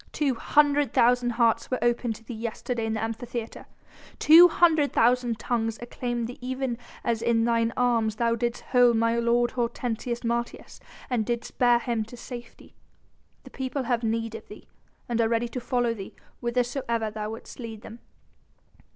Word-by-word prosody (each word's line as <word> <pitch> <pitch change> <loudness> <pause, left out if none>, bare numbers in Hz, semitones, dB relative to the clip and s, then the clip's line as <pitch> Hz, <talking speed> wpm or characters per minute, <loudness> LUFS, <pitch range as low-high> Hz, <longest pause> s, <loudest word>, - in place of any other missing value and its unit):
Two 285 -3 0
hundred 290 +3 +2
thousand 245 0 +3
hearts 230 -1 +2
were 255 - 0
opened 240 -1 +1
to 225 - -14
thee 240 - -8
yesterday 230 +1 -3
in 220 - -1
the 220 - -2
Amphitheatre! 230 +1 -5 0.5
Two 335 +3 +8
hundred 320 -4 +3
thousand 240 -1 +2
tongues 225 -1 -2
acclaimed 240 0 -3
thee 245 +2 -8
even 255 -1 -3 0.2
as 230 -2 0
in 230 -1 +2
thine 230 -1 +1
arms 230 -3 +1
thou 230 +1 +1
didst 235 +1 -2
hold 245 -2 +5
my 230 +1 +2
lord 240 +1 +2
Hortensius 240 -1 -3
Martius 235 0 -3 0.3
and 245 -4 0
didst 235 +1 -4
bear 245 -1 +5
him 235 -1 -2
into 225 +3 -5
safety. 240 -1 -10 0.7
The - - -13
people 265 +1 -3
have 240 -1 0
need 225 0 -2
of 225 - -9
thee, - - -13 0.4
and 235 -1 0
are 225 - +2
ready 230 +1 +1
to 250 - -4
follow 245 -1 0
thee 195 -4 -9 0.2
whithersoever 235 -2 -1
thou 210 0 -4
wouldst 225 +4 -9
lead 225 -3 -7
them. 225 +2 -10
235 Hz, 170 wpm, -26 LUFS, 230-245 Hz, 0.7 s, Two